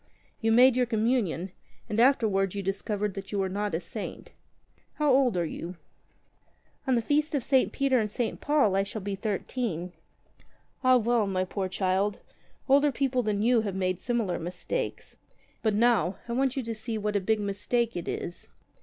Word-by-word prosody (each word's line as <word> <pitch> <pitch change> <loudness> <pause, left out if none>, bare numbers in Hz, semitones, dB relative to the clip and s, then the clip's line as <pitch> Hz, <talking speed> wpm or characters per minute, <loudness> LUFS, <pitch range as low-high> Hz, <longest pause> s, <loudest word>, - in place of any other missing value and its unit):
You 225 0 +2
made 250 +2 +6
your 250 -1 +2
Communion, 220 -6 0 0.4
and 210 - -2
afterwards 210 -7 +3
you 200 - -3
discovered 200 +1 -2
that 195 0 -7
you 205 - -2
were 195 -1 +1
not 205 -1 -2
a - - 0
saint. 190 +5 -7 0.6
How 295 -3 +3
old 255 -7 +3
are 170 - +1
you 170 +3 -6 0.6
?" - - -38
"On 260 - +3
the 235 - +1
feast 300 +4 +1
of 275 - 0
St. 265 0 +3
Peter 275 -2 +2
and 215 -1 -1
St. 230 +2 -3
Paul 285 -10 +3
I 195 - +3
shall 200 +1 -5
be 200 0 -3
thirteen." 195 -3 -3 0.9
41 255 -2 +5
^'Ah, - - -6
well, 235 -2 +2
my 185 -1 0
poor 190 0 -3
child, 190 +2 0 0.5
older 285 +2 +5
people 260 -1 0
than 210 -2 -1
you 240 0 +4
have 200 -3 -3
made 185 -1 -1
similar 235 -7 -1
mistakes. 180 - -4 0.4
But 220 -2 +1
now, 215 -5 +3
I 235 - -3
want 265 +2 +1
you 265 - -1
to 230 0 -4
see 220 +1 -4
what 210 0 -2
a - - +4
big 220 +3 +1
mistake 210 +4 -1
it 175 - -4
is. 175 - -4
215 Hz, 190 wpm, -28 LUFS, 195-250 Hz, 0.9 s, made